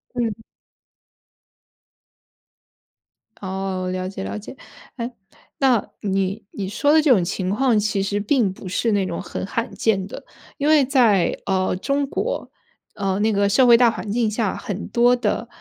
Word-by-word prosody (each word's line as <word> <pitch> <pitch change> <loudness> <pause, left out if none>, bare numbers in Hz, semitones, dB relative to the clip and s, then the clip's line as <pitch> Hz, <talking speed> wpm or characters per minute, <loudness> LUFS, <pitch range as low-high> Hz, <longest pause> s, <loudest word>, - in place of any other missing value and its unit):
嗯。 225 -2 -2 3.0
哦， 190 -1 -3
了 185 0 -3
解 190 - -6
了 100 +2 -4
解。 - - -10 0.4
哎？ 235 +1 -4 0.5
那， 255 -6 +3
你 195 +1 -1
你 195 -2 -5
说 260 +9 +1
的 315 - +6
这 305 - +1
种 200 -8 +5
情 185 +2 -2
况 235 +1 +2
其 205 -1 0
实 200 +1 -1
并 215 -1 +1
不 190 - -10
是 205 +5 0
那 200 -2 +1
种 175 -2 -4
很 - - -5
罕 230 +4 -3
见 195 -4 +1
的。 - - -9 0.3
因 290 - -1
为 305 -2 +5
在， 240 -9 +3
呃 185 -2 0
中 280 +8 0
国， - - -3 0.4
呃 195 -1 -1
那 220 +1 +2
个 200 0 +2
社 255 +6 +4
会 235 -1 +8
大 240 0 +5
环 220 -2 -5
境 230 0 +1
下 210 -2 -1
很 200 -1 -5
多 240 +1 +4
的， 225 -1 -2
210 Hz, 175 characters per minute, -22 LUFS, 190-240 Hz, 3.0 s, 会